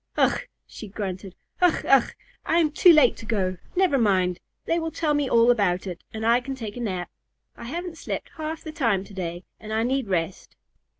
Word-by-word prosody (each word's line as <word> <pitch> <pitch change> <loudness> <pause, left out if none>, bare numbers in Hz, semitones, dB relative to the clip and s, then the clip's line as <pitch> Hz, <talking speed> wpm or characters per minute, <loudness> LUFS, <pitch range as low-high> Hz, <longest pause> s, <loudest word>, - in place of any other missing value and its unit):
"Ugh!" - - +3 0.2
she 220 - -10
grunted. 190 -2 -6 0.3
"Ugh! 355 -2 +3
Ugh! 270 -3 +5 0.3
I 330 - +1
am 320 -3 +3
too 350 +4 +7
late 300 -7 +5
to - - -10
go. 185 -5 -1 0.2
Never 360 -7 +3
mind! 185 -5 +2 0.3
They 335 - +1
will 325 0 -2
tell 320 -1 0
me 290 -2 0
all 235 +1 +5
about 200 -6 +1
it, 180 -2 -7
and 220 0 -5
I 235 +2 +4
can 270 +1 -5
take 220 -5 -7
a - - -6
nap. 185 -6 -3 0.4
I 235 - -10
haven't 335 +5 -5
slept - - -5
half 315 0 -5
the 315 - -6
time 230 - +1
to 200 - -14
day, 175 -2 -5 0.2
and 215 - -9
I 220 +1 +1
need 260 0 0
rest." 180 -1 -3
230 Hz, 205 wpm, -25 LUFS, 190-300 Hz, 0.4 s, too